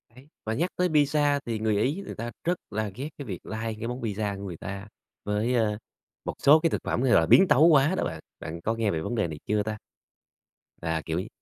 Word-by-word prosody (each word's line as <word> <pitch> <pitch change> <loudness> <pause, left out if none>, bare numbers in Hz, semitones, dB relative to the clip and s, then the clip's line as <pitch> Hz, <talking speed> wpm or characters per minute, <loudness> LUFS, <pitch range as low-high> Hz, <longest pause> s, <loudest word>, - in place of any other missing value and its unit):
Đấy, 130 +3 -16 0.2
và 110 - -1
nhắc 170 +9 0
tới 180 0 +1
pizza 145 -1 +3
thì 115 -2 -2
người 110 -1 +1
Ý 150 - 0
người - - -7
ta 120 +1 -5
rất 175 +1 +1
là 110 0 -2
ghét 140 +4 -5
cái 140 - -6
việc 95 -7 -6
lai 110 0 -4
cái 115 - -3
món 125 +1 -4
pizza 105 -2 -2
của 100 - -8
người 90 -4 -6
ta 100 +3 -6 0.4
với, 105 +4 0
ơ, 110 -3 +1 0.5
một - - -2
số 150 +3 +8
cái 165 - +2
thực - - -2
phẩm 120 - -1
hay 130 - +3
là 80 - +5
biến 190 - +7
tấu 155 +1 +6
quá 155 +3 +5
đó - - 0
bạn. - - -3 0.2
Bạn 85 +1 -6
có 110 +6 0
nghe 115 -3 +1
về 80 -3 -2
vấn 120 - -3
đề 105 -5 +1
này 75 -2 -7
chưa 105 0 +1
ta? 110 0 -3 1.1
Là 80 -1 -1
kiểu 80 0 -2
nh 105 - -6
110 Hz, 250 wpm, -27 LUFS, 100-140 Hz, 1.1 s, số